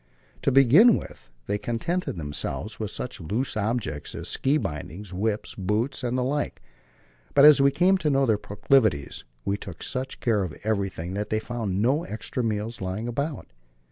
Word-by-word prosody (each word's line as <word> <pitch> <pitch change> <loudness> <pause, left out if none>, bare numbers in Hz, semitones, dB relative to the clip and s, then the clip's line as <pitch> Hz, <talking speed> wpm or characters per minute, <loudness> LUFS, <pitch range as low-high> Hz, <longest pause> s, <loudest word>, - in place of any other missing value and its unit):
To - - +2
begin 135 - +7
with - - -10 0.2
they 105 - -1
contented 120 - -2
themselves 80 +7 -4
with 110 -2 -3
such 120 -2 -5
loose 110 - -2
objects 105 -9 -2
as - - -4
ski 140 +3 +2
bindings, 90 - -5
whips, 105 +3 -2
boots, 110 +8 -1
and 125 +1 0
the 125 - +1
like; 145 +3 -2 0.8
but 140 0 +8
as 150 -2 +8
we 140 - +6
came 185 +6 +3
to 155 - +1
know 135 -1 +3
their 110 -4 +2
proclivities, 105 - +1 0.2
we 100 +1 0
took 90 -5 -8
such 130 0 -3
care 110 -4 +1
of 90 -4 -6
everything 95 -5 -2
that 105 +1 -3
they 110 - +1
found 110 -4 -2
no 140 +7 +2
extra 110 +2 -4
meals 110 0 -2
lying 95 +5 -3
about. 140 - -3
110 Hz, 175 wpm, -26 LUFS, 100-135 Hz, 0.8 s, but